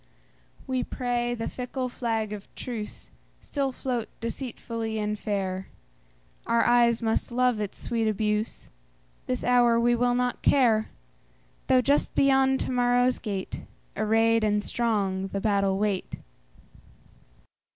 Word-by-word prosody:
We 260 -1 -1
pray 240 -1 -1
the 225 - -4
fickle 255 +1 -4
flag 225 -4 -2
of 205 -1 -8
truceStill 255 +4 -5
float 245 -3 -3
deceitfully 230 -2 -4
and 210 0 -2
fair; 190 -3 -2 0.8
Our 235 - +3
eyes 240 -1 +4
must 225 +2 0
love 250 -2 +2
its 205 -2 -4
sweet 230 -2 -1
abuse; 210 +1 -1 0.6
This 125 - -2
hour 240 -1 +4
we 240 +1 +3
will 245 0 +2
not 250 0 -1
care, 230 -6 +3 0.8
Though 255 -1 +5
just 280 +3 +1
beyond 265 -1 +4
to - - -2
morrow's 245 0 +2
gate, 200 -4 -4 0.3
Arrayed 225 +2 +3
and 210 -1 +1
strong, 200 -6 0
the 195 - -3
battle 195 -2 +1
wait. 200 -2 -1
230 Hz, 120 wpm, -27 LUFS, 210-245 Hz, 0.8 s, Though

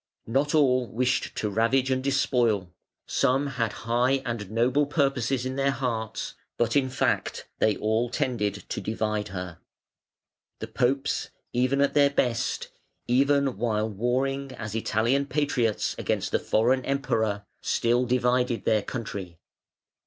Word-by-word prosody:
Not 140 +6 +1
all 130 -4 +3
wished 125 +3 -1
to 105 - -1
ravage 125 +5 +2
and 130 0 0
despoil; 120 -9 +1 0.3
some 135 +3 +1
had 120 -6 -1
high 125 +3 +2
and 115 -5 -4
noble 125 +6 +2
purposes 135 -4 0
in 130 +1 -3
their 140 0 +2
hearts, 120 -5 -3 0.2
but, 120 +1 +1
in 135 -2 +3
fact, 130 - -1
they 110 -2 +3
all 110 +3 0
tended 120 -7 -1
to - - -3
divide 110 -1 -2
her. 90 -3 -6 1.0
The - - -7
Popes 135 +3 0 0.2
even 130 +3 +2
at 140 - +2
their 140 -1 +5
best, 125 -3 -1 0.4
even 140 0 +2
while 110 -1 0
warring 130 +5 -1
as 110 -4 -6
Italian 115 +5 +1
patriots 135 -7 0
against - - -1
the - - +2
foreign 125 +4 +2
Emperor, 115 -7 -1 0.2
still 120 +2 +1
divided 125 -1 +1
their 110 -1 +3
country. 100 -7 -6
125 Hz, 135 wpm, -26 LUFS, 110-135 Hz, 1.0 s, their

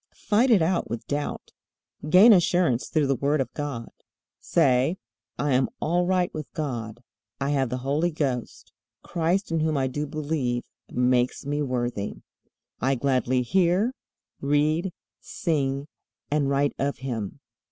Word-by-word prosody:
Fight 225 +5 +2
it 205 -8 +5
out 175 +2 0
with 115 -1 -5
doubt. 145 +3 -4 0.6
Gain 200 +8 +8
assurance 175 - +2
through 155 -2 +2
the 135 - +2
Word 145 +4 +1
of 130 -3 -2
God. 140 -6 -5 0.5
Say: 140 +1 +2 0.4
"I 145 +3 0
am 130 0 +2
all 175 +2 +1
right 180 -1 +1
with 155 -2 -6
God. 120 -6 -4 0.4
I 140 +1 0
have 135 -3 +1
the 125 - -2
Holy 150 +5 +1
Ghost. 135 -7 -3 0.3
Christ, 175 +3 0
in 165 - +1
whom 155 -1 +1
I 135 - +1
do 145 +3 -3
believe, 145 -5 -2 0.3
makes 125 0 +1
me 145 +1 -1
worthy. 120 -6 -2 0.6
I 135 +3 +1
gladly 130 -1 +1
hear, 185 - +2 0.5
read, 150 +6 +1 0.3
sing, 140 -4 -2 0.4
and 145 -2 +1
write 140 +1 +1
of 140 +1 -1
Him. 120 -6 -4
145 Hz, 140 wpm, -25 LUFS, 130-165 Hz, 0.6 s, Gain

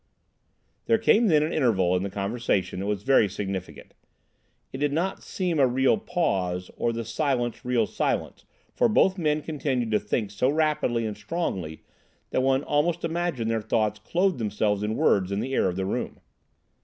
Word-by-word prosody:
There 230 - +4
came 225 +1 +4
then 155 -5 +4
an 155 - -2
interval 95 - +2
in 90 - 0
the 100 - -3
conversation 100 -2 -1
that 100 - -3
was 105 -1 -2
very 130 -5 +4
significant. 95 -1 -6 0.8
It 130 - -5
did 145 0 +1
not 175 +6 -1
seem 180 -5 -2
a 135 - +5
real 130 +2 +3
pause, 95 - -2
or 120 - 0
the 115 0 -4
silence 125 -5 -1
real 125 -3 +1
silence, - - -2 0.3
for 235 - +2
both 190 -3 +3
men 150 -2 0
continued 135 -7 -2
to 105 - +3
think 105 -1 -2
so 115 +6 +1
rapidly 150 -6 +1
and 105 -1 -3
strongly 100 - -4 0.5
that - - +1
one 135 +1 +2
almost 165 +4 0
imagined 165 -9 -1
their 115 -1 0
thoughts 110 -1 0
clothed 180 -3 0
themselves 105 -2 0
in 105 +1 -1
words 95 -3 +2
in 100 - -1
the 130 +5 -3
air - - +2
of 90 - -4
the 95 0 -2
room. 95 - -3
120 Hz, 180 wpm, -26 LUFS, 105-155 Hz, 0.8 s, a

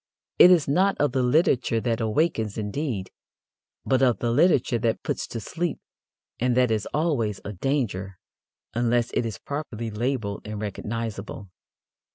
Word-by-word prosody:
It - - +10
is 175 -5 +5
not 185 +8 +2
of 145 -3 +2
the 130 0 +1
literature 125 -3 +2
that 115 0 -1
awakens, 110 -2 0
indeed, 105 -2 -3 0.7
but 130 -1 +2
of 125 -3 +4
the 120 - -1
literature 130 -4 +3
that 115 -1 -1
puts - - -2
to 115 - -5
sleep, 170 +8 -3 0.6
and 125 0 +1
that 125 -2 +4
is 110 -2 0
always 140 - 0
a 105 - -4
danger 95 -5 -2 0.6
unless 120 0 +1
it 115 - 0
is 110 - -5
properly 120 -6 -5
labelled 110 -2 -2
and 105 0 -6
recognizable. 105 -1 -5
120 Hz, 150 wpm, -25 LUFS, 110-140 Hz, 0.7 s, It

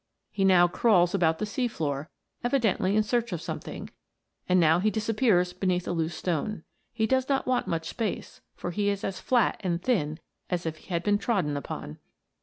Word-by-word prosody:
He 195 - -1
now 180 -2 +6
crawls 180 -2 +3
about 165 -4 +2
the 215 - -2
sea 245 +4 -1
floor, 150 -7 -3 0.3
evidently 225 -6 +1
in 215 - +4
search 235 +2 0
ofsomething, 170 -3 -5 0.6
and 180 0 +5
now 165 0 +5
he 210 +4 +2
disappears 215 -4 +1
beneath 180 -1 -1
a - - -1
loose 165 -1 -2
stohe. 180 +2 -2 0.3
He 225 -2 0
does 260 +3 +1
not 275 -1 +1
want 255 -1 0
much 165 -1 -2
space, 225 -5 -4
for 175 - -4
he 205 +2 0
is 200 -1 -2
as 190 -1 -3
flat 240 +3 +2
and 175 -2 0
thin 165 -9 0 0.3
as 175 -1 -2
if 160 -1 -3
he - - -19
had 170 -2 -1
been 205 -1 +2
trodden 190 - 0
upon. 75 - -6
185 Hz, 190 wpm, -27 LUFS, 170-220 Hz, 0.6 s, now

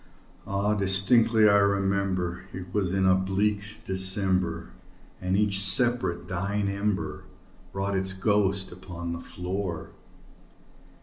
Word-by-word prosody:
Ah, 100 +2 0
distinctly 105 +3 +3
I 100 -1 +5
remember, 95 -3 -1
it 90 -1 -9
was 95 -4 0
in 95 0 0
the 95 - +5
bleak 100 +2 -2
December, 95 -3 -1 0.5
And 95 +1 -1
each 100 -2 +3
separate 100 -1 +4
dying 100 +3 -2
ember 100 0 -3 0.5
wrought 100 0 -3
its 95 0 0
ghost 95 -1 0
upon 85 -1 -7
the 85 - -6
floor. 90 -2 -5
95 Hz, 115 wpm, -26 LUFS, 95-100 Hz, 0.5 s, I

